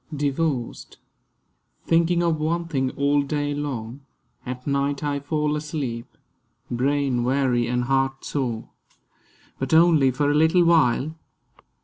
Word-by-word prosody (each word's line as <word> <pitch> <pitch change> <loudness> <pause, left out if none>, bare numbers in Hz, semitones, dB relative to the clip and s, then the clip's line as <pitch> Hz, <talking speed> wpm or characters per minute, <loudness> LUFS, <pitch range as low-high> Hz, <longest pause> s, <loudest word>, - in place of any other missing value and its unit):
DIVORCED 140 -3 -2 0.9
THINKING 170 +1 +2
of 165 -2 +1
one 170 +3 -1
thing 135 -5 -1
all 145 +1 +2
day 145 0 -2
long, 135 -3 -5 0.5
at 125 0 -6
night 140 0 -1
I 145 -1 -1
fall 150 +1 -1
asleep, 145 -6 -4 0.6
brain 130 0 0
weary 125 -2 +1
and 125 0 0
heart 135 +1 0
sore; 120 -6 -3 0.9
But 135 +4 0
only 160 -5 +5
for 145 +3 0
a - - +1
little 160 +3 +4
while. 155 -3 +3
140 Hz, 120 wpm, -23 LUFS, 130-155 Hz, 0.9 s, only